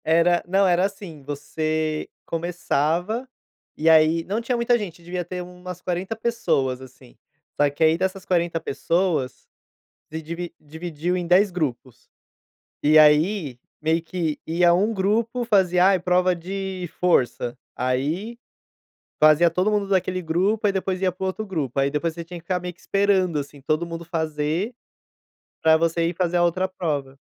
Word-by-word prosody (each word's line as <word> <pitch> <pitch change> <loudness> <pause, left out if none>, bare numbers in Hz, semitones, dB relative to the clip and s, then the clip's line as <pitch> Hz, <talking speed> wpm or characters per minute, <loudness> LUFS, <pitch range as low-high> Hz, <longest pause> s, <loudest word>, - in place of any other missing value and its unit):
Era 170 +2 +3
não 195 +2 +3
era 180 +1 +3
assim, 195 -6 -7
você 155 +2 -2 0.2
começava 175 - -1 0.5
e, 160 +2 +3
aí, 160 +1 +5
não 210 +4 -2
tinha 245 +2 -1
muita 240 0 +2
gente, 180 -6 -7
devia 175 +1 -3
ter 180 +1 -5
umas 180 0 -9
40 185 +5 -3
pessoas 140 - 0
assim, 125 - -15 0.4
só 145 0 +4
que, 145 +3 -2
aí, 160 +1 +4
dessas 190 +1 -2
40 170 -2 +1
pessoas 165 -2 -1 0.6
de 160 +1 -5
divi 170 +2 -6
dividiu 160 +3 -4
em 175 -1 -3
10 190 +3 +4
grupos. 135 -7 -4 0.7
E, 155 +1 +6
aí, 155 - +4 0.2
meio 160 +2 +1
que 165 -2 -3
ia 170 +1 +4
um 205 +6 +2
grupo 225 +5 0
fazia, 185 -5 +3
ai, 195 -1 +4
prova 180 +1 +2
de 185 0 -5
força, 125 -7 +1 0.2
aí 150 - -2 0.8
fazia 155 +2 +6
todo 185 +5 +1
mundo 205 -2 0
daquele 185 -1 0
grupo, 190 +7 +1
aí, 200 - +2
depois 190 -1 -2
ia 185 -1 +1
para 185 - -12
o - - 0
outro 215 +3 -4
grupo, 150 - -3
aí, 135 +1 +2
depois 150 +3 -1
você 170 0 -6
tinha 175 +1 -8
que - - -29
ficar 180 0 -1
meio 180 0 -6
que 175 - -27
esperando 195 -5 +1
assim 145 0 -7
todo 155 +5 -1
mundo 165 0 -6
fazer 160 +5 -2 0.9
para 160 0 +6
você 165 0 +1
ir 175 - -4
fazer 175 0 0
a 175 - +4
outra 185 +2 +1
prova. 145 -7 -3
175 Hz, 165 wpm, -23 LUFS, 155-185 Hz, 0.9 s, E